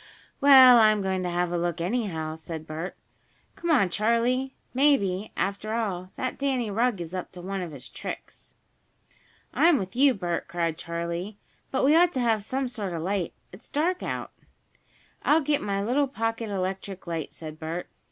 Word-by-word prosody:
"Well, 260 Hz, -4 st, +9 dB
I'm 215 Hz, -2 st, +4 dB
going 190 Hz, -1 st, 0 dB
to 180 Hz, -, -2 dB
have 175 Hz, 0 st, 0 dB
a 175 Hz, -, 0 dB
look, 175 Hz, 0 st, -1 dB
anyhow," 175 Hz, -5 st, -2 dB
said 160 Hz, 0 st, -7 dB
Bert. 160 Hz, +4 st, -6 dB, 0.6 s
"Come 345 Hz, -, -4 dB
on, 225 Hz, -, +4 dB
Charley. 235 Hz, +7 st, +1 dB, 0.2 s
Maybe, 220 Hz, -8 st, +2 dB
after 200 Hz, +3 st, -2 dB
all, 185 Hz, -6 st, -2 dB
that 255 Hz, -1 st, -3 dB
Danny 260 Hz, -6 st, 0 dB
Rugg 230 Hz, 0 st, +1 dB
is 170 Hz, 0 st, -6 dB
up 185 Hz, -1 st, -5 dB
to 180 Hz, -, -9 dB
some 195 Hz, +1 st, -4 dB
of 175 Hz, -3 st, -5 dB
his 135 Hz, -3 st, -10 dB
tricks." -, -, -9 dB, 1.0 s
"I'm 335 Hz, -2 st, +5 dB
with 190 Hz, -3 st, -5 dB
you, 270 Hz, 0 st, +5 dB
Bert!" 175 Hz, -3 st, -3 dB
cried 170 Hz, -2 st, -1 dB
Charley. 170 Hz, +4 st, -4 dB, 0.3 s
"But 265 Hz, -, +1 dB
we 295 Hz, +3 st, +5 dB
ought 350 Hz, +1 st, +5 dB
to 260 Hz, -, -1 dB
have 225 Hz, -4 st, +1 dB
some 265 Hz, +4 st, -2 dB
sort 205 Hz, -7 st, -4 dB
of 165 Hz, -, -3 dB
a -, -, -4 dB
light. 190 Hz, -3 st, -1 dB, 0.2 s
It's 185 Hz, -, -13 dB
dark 345 Hz, +5 st, 0 dB
out." -, -, -4 dB, 0.9 s
"I'll 305 Hz, -, +4 dB
get 290 Hz, 0 st, +1 dB
my 200 Hz, -1 st, -1 dB
little 270 Hz, +6 st, +2 dB
pocket 225 Hz, -3 st, -2 dB
electric 190 Hz, 0 st, -4 dB
light," 165 Hz, -3 st, -4 dB
said 155 Hz, -1 st, -9 dB
Bert. 165 Hz, +2 st, -4 dB
200 Hz, 180 wpm, -26 LUFS, 175-250 Hz, 1.0 s, Well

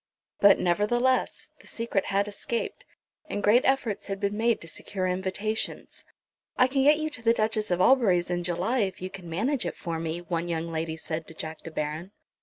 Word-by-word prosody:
But, 200 Hz, -1 st, +7 dB
nevertheless, 240 Hz, +8 st, +1 dB
the -, -, -15 dB
secret 230 Hz, -4 st, -1 dB
had 200 Hz, +1 st, +1 dB
escaped, 220 Hz, +3 st, -4 dB, 0.4 s
and 205 Hz, -, -3 dB
great 230 Hz, +4 st, +6 dB
efforts 260 Hz, -6 st, 0 dB
had 195 Hz, -1 st, -3 dB
been 200 Hz, 0 st, -1 dB
made 230 Hz, +1 st, +2 dB
to 170 Hz, -, -9 dB
secure 185 Hz, +3 st, -4 dB
invitations. 190 Hz, +4 st, -2 dB, 0.5 s
"I 255 Hz, -, +6 dB
can 270 Hz, +1 st, +1 dB
get 295 Hz, +2 st, +6 dB
you 310 Hz, 0 st, -2 dB
to 270 Hz, -, -8 dB
the 230 Hz, 0 st, +4 dB
Duchess 215 Hz, -1 st, 0 dB
of 175 Hz, -1 st, +1 dB
Albury's 185 Hz, -8 st, +4 dB
in 175 Hz, 0 st, -1 dB
July 180 Hz, +9 st, 0 dB
if 190 Hz, -3 st, -1 dB
you 185 Hz, +1 st, -5 dB
can 180 Hz, -3 st, -9 dB
manage 240 Hz, -, 0 dB
it -, -, -4 dB
for 165 Hz, -3 st, -3 dB
me," 165 Hz, 0 st, -2 dB
one 170 Hz, 0 st, -2 dB
young 165 Hz, 0 st, -2 dB
lady 160 Hz, 0 st, -3 dB
said 160 Hz, 0 st, -4 dB
to 165 Hz, -, -11 dB
Jack 160 Hz, 0 st, -6 dB
De -, -, -8 dB
Baron. 155 Hz, +5 st, -4 dB
195 Hz, 200 wpm, -27 LUFS, 170-230 Hz, 0.5 s, But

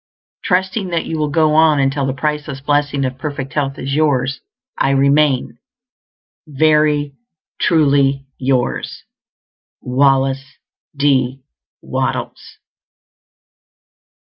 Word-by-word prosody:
Trusting 190 Hz, +1 st, 0 dB
that 170 Hz, -2 st, -2 dB
you 160 Hz, -, -4 dB
will 150 Hz, -1 st, 0 dB
go 155 Hz, 0 st, +2 dB
on 155 Hz, -2 st, +4 dB
until 135 Hz, 0 st, 0 dB
the 135 Hz, -, -1 dB
priceless 150 Hz, 0 st, -3 dB
blessing 145 Hz, 0 st, 0 dB
of 130 Hz, 0 st, -5 dB
perfect 140 Hz, -1 st, -5 dB
health 135 Hz, -2 st, -2 dB
is 135 Hz, +1 st, -4 dB
yours, 140 Hz, -3 st, 0 dB, 0.3 s
I -, -, +1 dB
remain, 140 Hz, 0 st, +2 dB, 0.9 s
Very 150 Hz, -1 st, +2 dB, 0.5 s
truly 140 Hz, -4 st, +2 dB
yours, 130 Hz, -2 st, -1 dB, 0.8 s
WALLACE 135 Hz, +1 st, +1 dB, 0.4 s
D. 135 Hz, -2 st, +1 dB, 0.4 s
WATTLES. -, -, -4 dB
140 Hz, 95 wpm, -17 LUFS, 135-150 Hz, 0.9 s, on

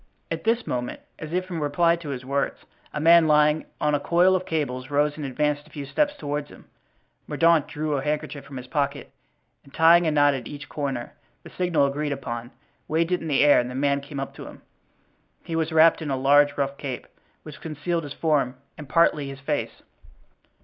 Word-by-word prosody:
At -, -, -4 dB
this 230 Hz, +1 st, +1 dB
moment, 125 Hz, -1 st, -3 dB, 0.2 s
as 155 Hz, -1 st, -7 dB
if 185 Hz, +1 st, -2 dB
in 170 Hz, -, -3 dB
reply 165 Hz, +3 st, +2 dB
to 165 Hz, -3 st, -8 dB
his 130 Hz, -2 st, -5 dB
words, 140 Hz, +1 st, -2 dB, 0.3 s
a 150 Hz, -, -4 dB
man 165 Hz, +1 st, +6 dB
lying 150 Hz, 0 st, +3 dB
on 150 Hz, 0 st, +1 dB
a 145 Hz, -, +2 dB
coil 175 Hz, +5 st, +3 dB
of 185 Hz, 0 st, -2 dB
cables 130 Hz, -5 st, -2 dB
rose 145 Hz, +1 st, +1 dB
and 155 Hz, -, -7 dB
advanced 145 Hz, +2 st, -1 dB
a -, -, -19 dB
few 145 Hz, -2 st, -7 dB
steps 290 Hz, -, 0 dB
toward 145 Hz, -, -3 dB
him. -, -, -16 dB, 0.6 s
Mordaunt 165 Hz, -3 st, +3 dB
drew 155 Hz, -1 st, -2 dB
a 135 Hz, -, -1 dB
handkerchief 150 Hz, 0 st, -3 dB
from 135 Hz, -, -10 dB
his 125 Hz, -, -7 dB
pocket, 140 Hz, +1 st, -2 dB, 0.5 s
and 140 Hz, -, -19 dB
tying 165 Hz, +3 st, +5 dB
a -, -, +2 dB
knot 145 Hz, -1 st, +4 dB
at 130 Hz, -4 st, -5 dB
each 145 Hz, 0 st, -9 dB
corner—the 135 Hz, -5 st, -6 dB
signal 170 Hz, -6 st, +1 dB
agreed 145 Hz, +1 st, -1 dB
upon—waved 135 Hz, +6 st, -4 dB
it 180 Hz, -, +1 dB
in 165 Hz, -, -5 dB
the 145 Hz, -2 st, +3 dB
air 145 Hz, -1 st, +6 dB
and 125 Hz, 0 st, -2 dB
the 125 Hz, -, -7 dB
man 140 Hz, +1 st, +1 dB
came 140 Hz, 0 st, -7 dB
up 135 Hz, -, -5 dB
to -, -, -10 dB
him. -, -, -13 dB, 0.8 s
He 165 Hz, -, -5 dB
was 160 Hz, 0 st, -1 dB
wrapped 160 Hz, +1 st, +5 dB
in 155 Hz, -, -4 dB
a 135 Hz, -, 0 dB
large 145 Hz, +2 st, +4 dB
rough 140 Hz, 0 st, -1 dB
cape, 130 Hz, -4 st, -5 dB, 0.4 s
which 155 Hz, -1 st, -11 dB
concealed 160 Hz, +2 st, -3 dB
his 145 Hz, -1 st, -7 dB
form 145 Hz, -5 st, 0 dB, 0.2 s
and 145 Hz, -3 st, -9 dB
partly 155 Hz, -3 st, +3 dB
his 135 Hz, 0 st, -8 dB
face. 145 Hz, +2 st, -3 dB
145 Hz, 205 wpm, -24 LUFS, 140-160 Hz, 0.8 s, man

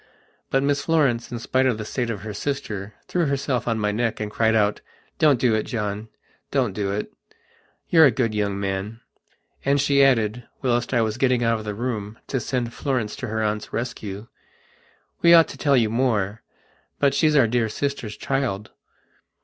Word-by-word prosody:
But 135 Hz, 0 st, +2 dB
Miss 140 Hz, 0 st, +1 dB
Florence, 140 Hz, -9 st, +1 dB
in 120 Hz, -, -3 dB
spite 130 Hz, +3 st, +1 dB
of 120 Hz, -4 st, +1 dB
the 110 Hz, -, -5 dB
state 120 Hz, +1 st, -2 dB
of 105 Hz, -4 st, -4 dB
her 105 Hz, 0 st, -6 dB
sister, 105 Hz, -5 st, -4 dB
threw 175 Hz, -3 st, 0 dB
herself 135 Hz, -3 st, -1 dB
on 115 Hz, -1 st, +1 dB
my 105 Hz, -1 st, 0 dB
neck 115 Hz, +1 st, -1 dB
and 105 Hz, -1 st, -4 dB
cried 110 Hz, +1 st, +2 dB
out: 105 Hz, -1 st, +2 dB, 0.4 s
"Don't 145 Hz, -5 st, +4 dB
do 120 Hz, -3 st, +3 dB
it, 110 Hz, -, +2 dB
John. 105 Hz, -1 st, -4 dB, 0.4 s
Don't 125 Hz, -7 st, 0 dB
do 100 Hz, -1 st, -2 dB
it. 100 Hz, +1 st, -4 dB, 0.7 s
You're 160 Hz, -3 st, +7 dB
a -, -, +5 dB
good 115 Hz, -2 st, 0 dB
young 100 Hz, -2 st, -1 dB
man," 100 Hz, +3 st, -3 dB, 0.6 s
and 140 Hz, +1 st, +2 dB
she 140 Hz, 0 st, +4 dB
added, 120 Hz, -3 st, +2 dB, 0.2 s
whilst 120 Hz, -2 st, +1 dB
I 120 Hz, -3 st, +3 dB
was 110 Hz, +2 st, -3 dB
getting 125 Hz, -2 st, +2 dB
out 115 Hz, -1 st, +2 dB
of 110 Hz, -, -8 dB
the 105 Hz, -1 st, -4 dB
room 110 Hz, -2 st, -4 dB
to 130 Hz, -, 0 dB
send 120 Hz, -1 st, -2 dB
Florence 125 Hz, -7 st, -2 dB
to -, -, -5 dB
her 110 Hz, 0 st, -1 dB
aunt's 105 Hz, 0 st, -2 dB
rescue: 110 Hz, -4 st, -5 dB, 1.0 s
"We 170 Hz, 0 st, +8 dB
ought 165 Hz, -1 st, +7 dB
to -, -, -9 dB
tell 140 Hz, -3 st, +3 dB
you 110 Hz, -3 st, +2 dB
more. 115 Hz, -4 st, 0 dB, 0.6 s
But 140 Hz, -1 st, +2 dB
she's 155 Hz, +2 st, +3 dB
our 135 Hz, -5 st, +6 dB
dear 115 Hz, 0 st, +1 dB
sister's 130 Hz, -3 st, -3 dB
child." 120 Hz, -7 st, -2 dB
115 Hz, 190 wpm, -23 LUFS, 105-135 Hz, 1.0 s, We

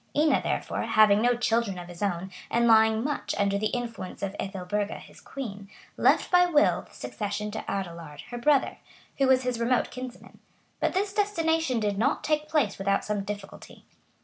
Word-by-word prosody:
Ina, 305 Hz, +1 st, +4 dB
therefore, -, -, -2 dB
having 215 Hz, -1 st, +4 dB
no 245 Hz, +1 st, +3 dB
children 230 Hz, -4 st, 0 dB
of 175 Hz, -1 st, -8 dB
his 175 Hz, +1 st, -11 dB
own 190 Hz, -2 st, -2 dB, 0.2 s
and 235 Hz, 0 st, +2 dB
lying 220 Hz, 0 st, +5 dB
much 295 Hz, +1 st, -2 dB
under 200 Hz, 0 st, +1 dB
the 215 Hz, -, +1 dB
influence 230 Hz, -6 st, -5 dB
of 195 Hz, 0 st, -3 dB
Ethelburga, 195 Hz, +2 st, -3 dB
his -, -, -15 dB
queen, 205 Hz, -7 st, -7 dB, 0.3 s
left -, -, +3 dB
by 360 Hz, 0 st, +6 dB
will 300 Hz, -4 st, +3 dB
the -, -, -20 dB
succession 210 Hz, 0 st, -4 dB
to 220 Hz, -, -5 dB
Adelard, 170 Hz, -6 st, -5 dB
her 240 Hz, -, -5 dB
brother, 280 Hz, +2 st, +2 dB, 0.4 s
who 270 Hz, -, +4 dB
was 260 Hz, 0 st, +4 dB
his 250 Hz, -2 st, -2 dB
remote 240 Hz, +1 st, +1 dB
kinsman; 255 Hz, -1 st, -9 dB, 0.4 s
but -, -, 0 dB
this 395 Hz, +1 st, 0 dB
destination 325 Hz, -, +1 dB
did 205 Hz, -2 st, -1 dB
not 270 Hz, +6 st, +1 dB
take 305 Hz, 0 st, 0 dB
place 285 Hz, -12 st, +1 dB
without 195 Hz, 0 st, 0 dB
some 210 Hz, -1 st, -1 dB
difficulty. 205 Hz, 0 st, -9 dB
220 Hz, 175 wpm, -27 LUFS, 200-265 Hz, 0.4 s, by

